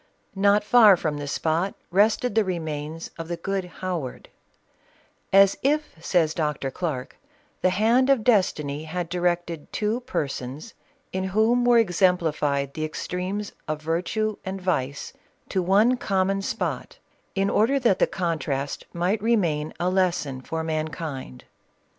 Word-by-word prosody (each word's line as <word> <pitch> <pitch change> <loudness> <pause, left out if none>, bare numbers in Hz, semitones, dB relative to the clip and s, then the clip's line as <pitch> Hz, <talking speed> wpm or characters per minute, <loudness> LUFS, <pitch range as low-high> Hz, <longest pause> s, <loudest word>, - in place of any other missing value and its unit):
Not 200 +1 +3
far 210 -3 +7
from 155 -3 -2
the 145 - -5
spot 165 +6 -1 0.2
rested 215 +5 +3
the 220 0 +3
remains 160 -3 -4
of 165 - -5
the 170 0 -3
good 195 +2 -2
Howard, 175 -7 -5 0.5
" - - -35 0.2
As 195 0 +6
if," 300 +3 0
says 165 -4 +2
Dr. 150 -4 -2
Clarke, 145 -6 -4 0.2
" - - -38
the 185 - +4
hand 230 +8 +3
of 270 -5 +4
des 220 -5 +6
tiny 150 -3 -5
had 170 +1 -4
directed 175 -2 -2
two 215 +3 -1
persons, 140 - -4 0.4
in 190 0 -1
whom 220 +5 +2
were 240 -1 +6
exempli 180 -4 +2
fied 140 -2 -1
the 155 - -4
extremes 180 +6 -3 0.2
of 155 -1 -2
virtue 185 +7 -1
and 190 +1 -4
vice, 145 -7 -2 0.4
to 190 - 0
one 210 +8 +4
common 195 -3 0
spot, - - -3 0.4
in 195 0 +1
order 255 +6 +3
that 230 -7 +2
the - - +4
contrast 150 -6 -2
might 180 +5 0
remain 170 -10 +1
a 175 - 0
lesson 170 -8 0
for 160 +4 -4
mankind." 155 - -4
180 Hz, 145 wpm, -25 LUFS, 155-205 Hz, 0.5 s, far